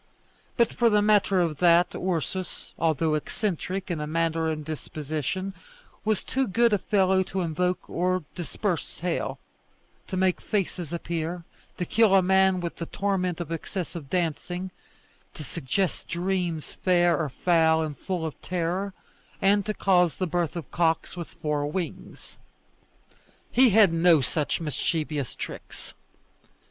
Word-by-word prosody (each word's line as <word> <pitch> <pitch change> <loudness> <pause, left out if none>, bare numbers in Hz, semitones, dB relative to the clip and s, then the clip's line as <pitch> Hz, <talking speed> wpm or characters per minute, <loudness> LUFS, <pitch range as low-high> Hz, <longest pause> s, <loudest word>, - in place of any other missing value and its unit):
But 235 -1 +3
for 235 -1 +3
the 210 -1 +3
matter 205 -2 +4
of 160 -4 0
that, 175 +1 +4
Ursus, 185 +1 -3
although 160 -1 +2
eccentric 185 +3 -2
in 165 - -2
manner 165 0 +1
and 155 -1 -3
disposition, 155 +4 -4 0.5
was 215 -3 0
too 265 0 0
good 230 +3 +3
a 205 - +3
fellow 190 -2 +3
to 190 0 -2
invoke 180 +2 -1
or 185 0 0
disperse 175 0 -3
hail, 175 -1 -1 0.7
to 185 - -3
make 185 -1 +2
faces 180 -6 -2
appear, 170 0 -3 0.3
to 180 - -2
kill 215 +1 +4
a 190 - +5
man 190 0 +4
with 170 -1 -4
the 170 - -5
torment 185 -4 -1
of 170 -2 -5
excessive 165 -3 -5
dancing, 180 +2 -2 0.6
to 155 - -7
suggest 150 +7 -2
dreams 175 -3 -2
fair 175 -2 +3
or 155 -3 -1
foul 160 +2 +3
and 150 -2 -4
full 180 -1 -3
of 155 - -6
terror, 180 +2 -2 0.4
and 200 +1 +3
to 215 - 0
cause 180 -4 +3
the 185 - 0
birth 175 -1 -1
of 170 - -6
cocks 165 -1 +1
with 175 -2 -5
four 150 -1 -2
wings. 170 +3 -6 1.1
He 255 0 +6
had 205 -4 +6
no 165 -1 +5
such 145 +3 -1
mischievous 150 -2 -2
tricks. - - -8
175 Hz, 140 wpm, -26 LUFS, 160-190 Hz, 1.1 s, He